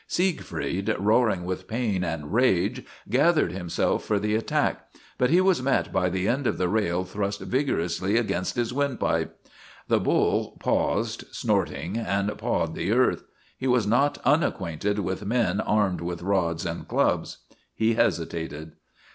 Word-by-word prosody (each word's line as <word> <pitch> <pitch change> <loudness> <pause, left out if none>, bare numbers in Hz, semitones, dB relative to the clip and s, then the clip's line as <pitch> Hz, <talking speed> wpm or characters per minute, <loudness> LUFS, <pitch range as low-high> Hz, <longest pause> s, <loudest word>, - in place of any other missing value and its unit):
Siegfried, 115 - -1
roaring 105 -2 +2
with 95 0 -4
pain 110 -5 -1
and 80 -1 -4
rage, 115 -7 +2 0.2
gathered 145 - +3
himself 90 -2 -1
for 105 - 0
the 105 +1 -1
attack, 110 +1 0 0.3
but 125 - +3
he 170 +4 +5
was 185 -6 +3
met 135 +1 0
by 90 -1 +2
the 95 +2 -1
end 130 +2 +1
of - - 0
the 90 - +1
rail 90 -3 0
thrust 100 +2 -3
vigorously 100 - 0
against 90 -6 -1
his 120 0 -1
windpipe. 140 -2 -1 0.5
The - - +4
bull - - +1
paused, - - 0
snorting, 90 +7 -1
and 100 -1 -1
pawed - - -1
the - - -2
earth. - - +2 0.3
He 130 - -3
was 125 -4 +3
not 125 +7 +2
unacquainted 105 - +1
with 95 0 -2
men 105 -3 +1
armed 105 -4 +1
with 85 0 -4
rods 90 -3 0
and 85 -1 -4
clubs; - - 0 0.4
he 110 +1 +2
hesitated. 80 -5 -1
100 Hz, 145 wpm, -26 LUFS, 90-120 Hz, 0.5 s, he